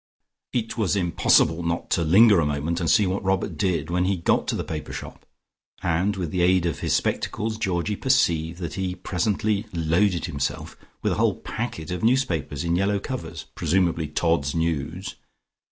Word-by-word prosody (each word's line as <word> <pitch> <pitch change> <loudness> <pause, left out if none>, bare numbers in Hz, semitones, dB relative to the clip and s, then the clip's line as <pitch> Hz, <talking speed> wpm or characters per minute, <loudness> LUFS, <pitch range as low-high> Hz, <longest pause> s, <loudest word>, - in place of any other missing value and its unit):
It 115 -1 -2
was 105 -3 +1
impossible 85 -2 +3
not 85 0 -3
to 85 - +2
linger 100 +5 +6
a 80 - +2
moment 75 +4 -1
and 85 -3 0
see 105 -3 +5
what 95 +2 -2
Robert 95 -1 0
did 85 -5 -1
when 90 +1 +1
he 95 0 +1
got 85 - +1
to - - 0
the - - -2
paper 75 -1 -6
shop, - - -9 0.6
and 90 +4 +1
with 90 -5 -3
the 90 - 0
aid 90 0 +3
of 85 -6 -2
his - - +1
spectacles 110 +1 -1
Georgie 95 -1 -1
perceived 85 -11 +1
that 85 -4 -4
he 95 -1 -3
presently 100 +3 -1
loaded 85 +2 +1
himself 75 -5 -3 0.3
with - - +1
a - - 0
whole - - +2
packet 110 -10 -5
of 90 - -3 0.3
papers 75 -4 -3
in 85 0 +1
yellow 100 +3 +1
covers, 85 -9 -6
presumably 85 -2 +1
"Todd's 75 -1 0
News." 80 +2 -2
85 Hz, 175 wpm, -24 LUFS, 80-95 Hz, 0.6 s, linger